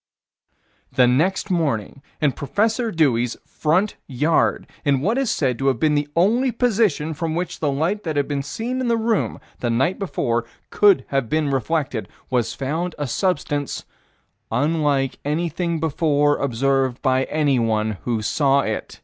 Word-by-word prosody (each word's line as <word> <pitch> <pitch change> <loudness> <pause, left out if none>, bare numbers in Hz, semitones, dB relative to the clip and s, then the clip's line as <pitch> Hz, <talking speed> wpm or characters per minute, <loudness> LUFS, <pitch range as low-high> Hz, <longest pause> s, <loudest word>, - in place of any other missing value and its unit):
The 125 - +4
next 175 +11 +1
morning, 140 - -1 0.2
in 150 -2 +3
Prof. 220 - -1
Dewey's 125 -7 +2
front 180 +7 0
yard, 150 +5 +1 0.2
in 140 -3 +2
what 220 - +1
is 270 -4 0
said 130 -5 0
to 135 - 0
have 130 -4 +2
been 155 +2 +3
the 145 0 +1
only 230 +9 +3
position 215 - +1
from 160 +1 -3
which 175 0 -3
the 150 -3 0
light 165 +9 0
that 160 -6 -3
had 145 - +1
been 145 -1 -1
seen 235 - -3
in 255 - -1
the 230 -1 +2
room, 225 -2 0 0.2
the 120 - -1
night 135 +10 +1
before, 120 -11 -1 0.3
could 205 -3 +4
have 135 -5 0
been 155 -2 +1
reflected, 135 -3 -1 0.2
was 120 -3 0
found 160 +6 -2
a 145 - -2
substance 145 - -1 0.7
"unlike 145 +1 +1
anything 170 +2 -1
before 145 -2 +2
observed 135 0 +1
by 130 -1 +2
anyone 115 -8 0
who 115 -3 -2
saw 140 +4 +3
it." 110 -4 -4
150 Hz, 155 wpm, -22 LUFS, 135-175 Hz, 0.7 s, The